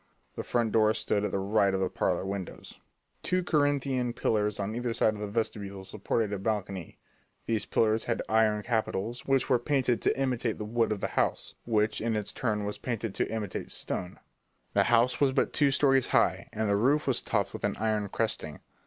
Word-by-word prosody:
The - - -3
front 115 -2 0
door 110 0 +3
stood 105 - 0
at 105 - -1
the - - 0
right 100 0 +2
of - - 0
the 95 - +1
parlour 90 0 -1
windows. 95 -1 -6 0.4
Two 185 0 0
Corinthian 140 -6 +1
pillars 105 -3 0
on 100 +2 -2
either 120 -1 -2
side 110 - +3
of 105 - -8
the 105 - -3
vestibule 100 -2 -3
supported 105 +1 -1
a 100 - -2
balcony; 100 -4 -3 0.5
these 110 -2 -1
pillars 110 0 +2
had 120 - -1
iron 110 -1 +2
capitals 115 0 -2
which 135 -1 +2
were 125 -3 +3
painted 130 -2 +1
to - - +1
imitate 125 -4 0
the 105 - -5
wood 115 +1 +1
of 105 -2 -2
the - - -1
house, - - -1
which 110 -2 +1
in 115 0 0
its 105 -1 -1
turn 105 -4 -1
was 105 - -4
painted 115 -4 -3
to - - -1
imitate 110 -4 -4
stone. 90 0 -4 0.6
The - - +3
house 120 +3 +3
was 135 -2 +4
but 130 - +1
two 145 -2 +4
stories 135 -1 +3
high, - - +2
and 110 0 -1
the 100 - +2
roof 140 +8 +2
was 135 - +1
topped - - -1
with - - -7
an - - 0
iron 105 -1 0
cresting. 95 -9 -2
110 Hz, 200 wpm, -29 LUFS, 105-120 Hz, 0.6 s, was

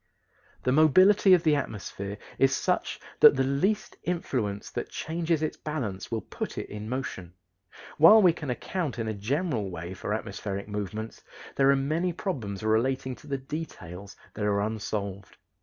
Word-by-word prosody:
The 125 - +2
mobility 185 +7 +6
of 175 - -1
the 155 -3 +4
atmosphere 100 -6 -4 0.2
is 135 0 +4
such - - -1 0.2
that - - +9
the 135 - +2
least 140 +11 0
influence 125 - -2
that - - -4
changes 165 -1 -1
its 155 - -2
balance 120 -12 -4
will 115 -2 -2
put - - -6
it - - -4
in 105 +1 -6
motion. 95 -9 -5 0.6
While 165 +8 +9
we 180 -5 +6
can 150 -4 -6
account 150 +2 -3
in 115 -2 -2
a 110 - -1
general 115 - -1
way 85 +1 -6
for 95 - -5
atmospheric 100 -2 -5
movements, 105 +1 -5 0.3
there 135 0 +4
are 140 - +6
many 155 +6 0
problems 115 - -4
relating 130 +4 +1
to - - -16
the 140 -1 -1
details 105 - -7 0.2
that 105 - -4
are 100 -1 +2
unsolved. 100 -2 -4
125 Hz, 160 wpm, -28 LUFS, 105-155 Hz, 0.6 s, that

